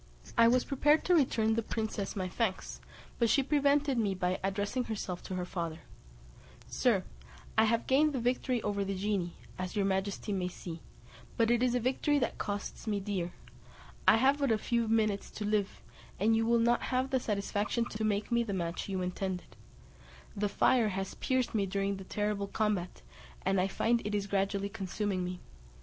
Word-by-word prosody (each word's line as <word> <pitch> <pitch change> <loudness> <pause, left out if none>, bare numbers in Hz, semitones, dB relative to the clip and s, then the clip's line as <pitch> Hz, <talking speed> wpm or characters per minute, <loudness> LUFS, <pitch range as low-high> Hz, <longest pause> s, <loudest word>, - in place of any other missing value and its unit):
I 230 - +6
was 250 +1 +3
prepared 295 +3 +3
to 360 - +4
return 230 -8 +3
the 230 - +1
princess 215 -3 -3
my 185 -2 -2
thanks, 190 0 -2 0.4
but 235 -2 +3
she 275 - +4
prevented 285 -1 +2
me 200 -4 +1
by 180 0 -1
addressing 205 +6 -1
herself 195 -5 -4
to 185 - -4
her 180 -1 -2
father: 170 -3 -4 0.8
"Sir, 215 -7 +1 0.5
I 220 - +5
have 230 +1 +1
gained 295 +3 +4
the 260 - -1
victory 245 0 0
over 200 -1 0
the 195 0 -2
genie, 190 -3 -1 0.3
as 185 -1 -4
your 200 -2 +2
majesty 195 +2 -1
may 185 -2 -1
see; 170 -2 -7 0.6
but 230 0 +3
it 240 0 +3
is 250 -1 +2
a - - +2
victory 265 +4 +1
that 280 - -1
costs 205 +2 -4
me 205 -2 0
dear; 190 -3 -3 0.7
I 220 - +8
have 270 +4 +3
but 280 -4 +2
a 220 - +3
few 235 +1 0
minutes 215 -2 +1
to 210 - -5
live, 205 -1 -1 0.4
and 220 +3 +4
you 225 0 +1
will 235 0 +4
not 235 +1 +3
have 260 +1 -1
the 260 - +3
satisfaction 210 +1 -1
to 220 -1 -4
make 210 -1 0
the 235 -3 +1
match 170 0 -3
you 190 -1 -1
intended; 180 0 -4 0.8
the 205 0 0
fire 230 +2 +3
has 195 -1 -3
pierced 260 -2 0
me 200 -3 +1
during 195 +1 -1
the 190 - -9
terrible 205 0 -1
combat, 200 -4 -1 0.4
and 195 0 +3
I 185 - +2
find 230 +4 +1
it 210 0 -2
is 200 -1 0
gradually 200 0 0
consuming 200 -2 -2
me. 180 0 -5
210 Hz, 185 wpm, -31 LUFS, 195-235 Hz, 0.8 s, I